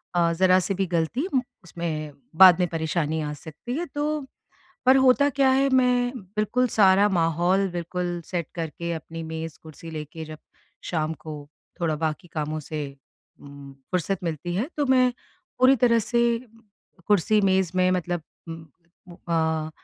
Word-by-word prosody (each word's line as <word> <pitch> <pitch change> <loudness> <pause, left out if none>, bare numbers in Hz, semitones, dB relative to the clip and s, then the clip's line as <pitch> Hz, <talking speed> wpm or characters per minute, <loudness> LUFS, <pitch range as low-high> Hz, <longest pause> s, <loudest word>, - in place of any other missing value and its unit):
अ, 170 -1 +3
ज़रा-सी 185 +2 +3
भी 195 +1 -1
ग़लती 175 - -1
उम, 260 - +3 0.2
उसमें 160 -3 -4 0.3
बाद 185 -2 +9
में 180 - +2
परेशानी 160 -1 -1
आ 150 0 -3
सकती 160 - -8
है। 345 - -2
तो 295 -1 -3 0.6
पर 260 +1 +7
होता 265 +2 +5
क्या 270 -1 +3
है 270 +1 +3
मैं 250 -1 +3 0.2
बिल्कुल 225 +4 +1
सारा 200 -1 +5
माहौल 175 +2 +1
बिल्कुल 175 0 -3
सेट 175 -3 -3
करके 170 0 -4
अपनी 165 0 -6
मेज़ 160 0 -6
कुर्सी 160 +1 -11
लेके 155 +1 -7
जब 155 0 -9 0.5
शाम 155 -2 -1
को 155 - -6 0.5
थोड़ा 160 -3 0
बाकी 160 +3 -3
कामों 155 -1 -3
से 150 +1 -5 0.6
उम, 140 -1 -12 0.2
फ़ुर्सत 180 +1 -1
मिलती 170 +1 -3
है। 225 - -1
तो 290 -2 0
मैं 255 -1 +4 0.5
पूरी 260 +2 +6
तरह 235 -1 +4
से 235 +1 +1 0.7
कुर्सी 210 +1 +3
मेज़ 190 -3 +2
में 185 0 +3
मतलब 175 -2 -1 0.3
उम, 165 -1 -8 0.6
अ 160 -1 0
175 Hz, 150 wpm, -25 LUFS, 160-230 Hz, 0.7 s, बाद